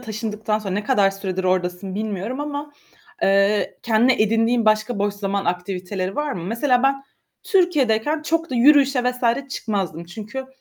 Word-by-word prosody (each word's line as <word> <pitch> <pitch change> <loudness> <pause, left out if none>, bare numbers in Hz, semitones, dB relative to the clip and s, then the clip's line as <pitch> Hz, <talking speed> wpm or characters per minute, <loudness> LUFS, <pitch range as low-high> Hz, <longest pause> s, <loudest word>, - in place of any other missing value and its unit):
taşındıktan 220 -2 -3
sonra 195 -3 -5
ne 210 - -2
kadar 205 -6 +3
süredir 190 -1 -4
oradasın 185 +1 -1
bilmiyorum 215 +5 -3
ama, 290 0 -5 0.5
eee, 200 +1 +2
kendine 230 +1 +3
edindiğin 225 +2 +2
başka 215 +1 +2
boş 205 0 0
zaman 200 -1 -2
aktiviteleri 185 +1 -3
var 295 -1 -1
mı? 170 -8 -5
Mesela 245 +5 +1
ben 275 0 +1 0.4
Türkiye'deyken 305 - +1
çok 330 0 -1
da - - -3
yürüyüşe 275 0 +5
vs. 250 +2 0
çıkmazdım. 190 - -3
Çünkü 215 +9 -7
220 Hz, 145 wpm, -22 LUFS, 195-260 Hz, 0.5 s, yürüyüşe